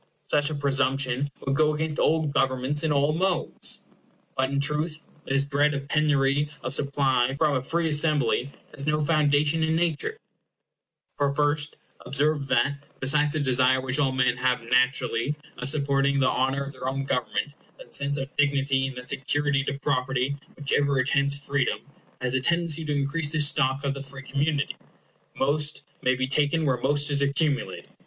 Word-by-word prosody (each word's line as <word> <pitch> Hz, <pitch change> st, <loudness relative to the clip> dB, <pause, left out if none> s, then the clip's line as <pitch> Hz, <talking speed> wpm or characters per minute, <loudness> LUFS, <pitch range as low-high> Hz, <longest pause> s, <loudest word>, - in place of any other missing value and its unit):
Such 145 Hz, 0 st, +3 dB
a 155 Hz, -, -3 dB
presumption 135 Hz, -1 st, 0 dB, 0.2 s
would 135 Hz, 0 st, 0 dB
go 155 Hz, +1 st, +2 dB
against 155 Hz, 0 st, -3 dB
all 160 Hz, 0 st, +2 dB
governments 135 Hz, 0 st, +1 dB
in 160 Hz, -, 0 dB
all 145 Hz, +1 st, +2 dB
modes. 180 Hz, +1 st, 0 dB, 0.5 s
But, 130 Hz, 0 st, 0 dB
in 140 Hz, 0 st, -1 dB
truth, 150 Hz, +2 st, -1 dB, 0.2 s
this 135 Hz, +1 st, +1 dB
dread 145 Hz, +1 st, +1 dB
of 140 Hz, 0 st, -6 dB
penury 145 Hz, -1 st, +2 dB
of -, -, 0 dB
supply 135 Hz, -3 st, +1 dB
from 150 Hz, -2 st, +2 dB
a 130 Hz, -, 0 dB
free 165 Hz, +5 st, -1 dB
assembly 145 Hz, -4 st, +2 dB, 0.2 s
has 140 Hz, +1 st, -3 dB
no 150 Hz, 0 st, +1 dB
foundation 150 Hz, 0 st, +2 dB
in 160 Hz, 0 st, +1 dB
nature; 170 Hz, -, -1 dB, 1.0 s
for 140 Hz, -1 st, +1 dB
first, 150 Hz, 0 st, 0 dB, 0.3 s
observe 145 Hz, +1 st, +1 dB
that, 140 Hz, +3 st, +1 dB, 0.2 s
besides 145 Hz, +2 st, +2 dB
the 155 Hz, -, -1 dB
desire 130 Hz, -1 st, +3 dB
which 130 Hz, +2 st, -1 dB
all 135 Hz, -2 st, +2 dB
men 125 Hz, -1 st, +1 dB
have 125 Hz, -1 st, 0 dB
naturally 125 Hz, +1 st, +1 dB, 0.2 s
of 125 Hz, -, +1 dB
supporting 140 Hz, -1 st, +2 dB
the 130 Hz, -, +3 dB
honor 135 Hz, +2 st, 0 dB
of 140 Hz, -, -7 dB
their 130 Hz, -1 st, -4 dB
own 135 Hz, +1 st, -3 dB
government, 135 Hz, +2 st, -2 dB, 0.2 s
that -, -, -14 dB
sense 140 Hz, +1 st, +1 dB
of 135 Hz, 0 st, -6 dB
dignity 140 Hz, -2 st, +1 dB
and 135 Hz, -1 st, -8 dB
that 125 Hz, 0 st, -5 dB
security 140 Hz, +1 st, 0 dB
to 140 Hz, -, -3 dB
property 135 Hz, -1 st, -1 dB, 0.2 s
which 145 Hz, -2 st, -5 dB
ever 140 Hz, -1 st, +2 dB
attends 140 Hz, +2 st, +2 dB
freedom 140 Hz, -2 st, -1 dB, 0.4 s
has 125 Hz, 0 st, +2 dB
a 130 Hz, -, +1 dB
tendency 170 Hz, +1 st, +2 dB
to 150 Hz, -, -3 dB
increase 145 Hz, +2 st, 0 dB
the 155 Hz, -, 0 dB
stock 140 Hz, -2 st, +2 dB
of 140 Hz, -1 st, 0 dB
the 140 Hz, -, -7 dB
free 140 Hz, 0 st, -8 dB
community. 140 Hz, +1 st, -1 dB, 0.6 s
Most 150 Hz, +2 st, +1 dB, 0.2 s
may 130 Hz, 0 st, +2 dB
be 130 Hz, +1 st, -1 dB
taken 145 Hz, +4 st, +1 dB
where 130 Hz, -3 st, +1 dB
most 145 Hz, +3 st, 0 dB
is 140 Hz, -1 st, 0 dB
accumulated. 140 Hz, 0 st, -1 dB
140 Hz, 175 wpm, -25 LUFS, 135-150 Hz, 1.0 s, Such